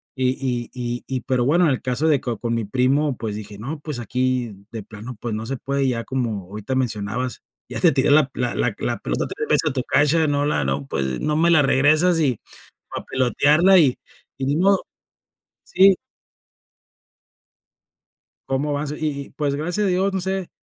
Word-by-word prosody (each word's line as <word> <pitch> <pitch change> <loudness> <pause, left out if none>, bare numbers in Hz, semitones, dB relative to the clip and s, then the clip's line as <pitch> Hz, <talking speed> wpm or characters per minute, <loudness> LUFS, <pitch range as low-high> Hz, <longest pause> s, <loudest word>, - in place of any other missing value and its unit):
y 130 -1 +1
y 125 -2 -2
y 120 -1 -4
y 130 -1 -3
pero 125 -1 0
bueno, 170 +6 +3
en 155 - +3
el 130 - -2
caso 130 +5 0
de 150 -4 +3
que 120 -3 -3
con 115 -1 -3
mi 115 - -1
primo, 130 +5 +1
pues 110 -2 -4
dije: 105 -1 -8
"No, 145 +8 -5
pues 150 -3 -5
aquí 125 -4 -2
de 110 -3 -6
plano, 110 +4 -9
pues, 120 -2 -3
no 110 - -4
se 135 - -3
puede", 140 +2 -1
ya 115 -2 -1
como 115 -7 -2
ahorita 105 +5 -4
mencionabas, 120 -1 -2 0.3
ya - - -1
te - - +6
tiré - - +3
la 145 -2 +5
la 125 -1 -1
la - - 0
la - - -2
pelota - - -2
3 445 - -5
veces 155 - +2
a - - -7
tu 130 - -1
cancha, 155 +4 +3
no 145 0 +1
la 150 - +1
no, 70 +1 -2
pues, 65 -2 -2
no 150 0 0
me 170 +1 +3
la 155 -3 +5
regresas, 155 +6 +4
y 130 -7 +1 0.6
a - - -6
pelotearla 150 +8 +3
y 140 -6 +3 0.4
y 135 - -2
ni 145 - +1
modo. 195 +3 +3 0.8
Sí. 195 +1 +5 2.6
¿Cómo 145 +2 0
vas? 145 0 -2
Y - - -4
y 140 -2 -3
y - - -19
pues 145 -2 -2
gracias 175 +8 -1
a - - +2
Dios, 190 +2 +1
no 190 - -1
sé, 190 0 -2
135 Hz, 200 wpm, -22 LUFS, 120-150 Hz, 2.6 s, te